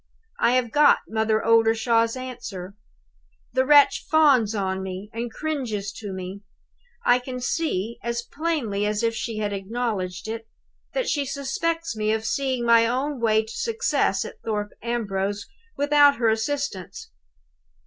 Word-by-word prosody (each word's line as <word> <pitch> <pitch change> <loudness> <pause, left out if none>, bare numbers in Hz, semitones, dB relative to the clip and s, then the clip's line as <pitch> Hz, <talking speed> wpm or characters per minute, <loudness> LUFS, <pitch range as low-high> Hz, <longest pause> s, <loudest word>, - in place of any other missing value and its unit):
"I 240 - +3
have 250 -3 +1
got 295 0 +5
Mother 220 0 0
Oldershaw's 230 +1 +3
answer. 225 -7 -7 0.8
The 260 +1 +2
wretch 290 -1 +6
fawns 275 -9 +4
on 190 -2 -1
me, 190 +2 -6
and 230 +1 -4
cringes 235 -10 -3
to 205 -3 -6
me. 190 +1 -6 0.6
I 245 +1 +5
can 250 0 -6
see, 235 - -2
as 235 0 -2
plainly 250 -11 -2
as 210 +1 -1
if 230 0 +2
she 225 0 -4
had 205 -1 -2
acknowledged 195 -2 -3
it, 225 0 -5 0.5
that - - 0
she 290 - +1
suspects 280 +3 -2
me 215 0 0
of 220 0 -2
seeing 260 -1 -1
my 230 -1 +5
own 265 +3 -1
way 220 -1 +3
to 220 - -10
success 465 0 0
at - - -10
Thorpe 210 -2 -2
Ambrose 205 -4 -2 0.3
without 290 0 +5
her 230 -1 +2
assistance. 220 - -3
230 Hz, 145 wpm, -24 LUFS, 210-265 Hz, 0.8 s, wretch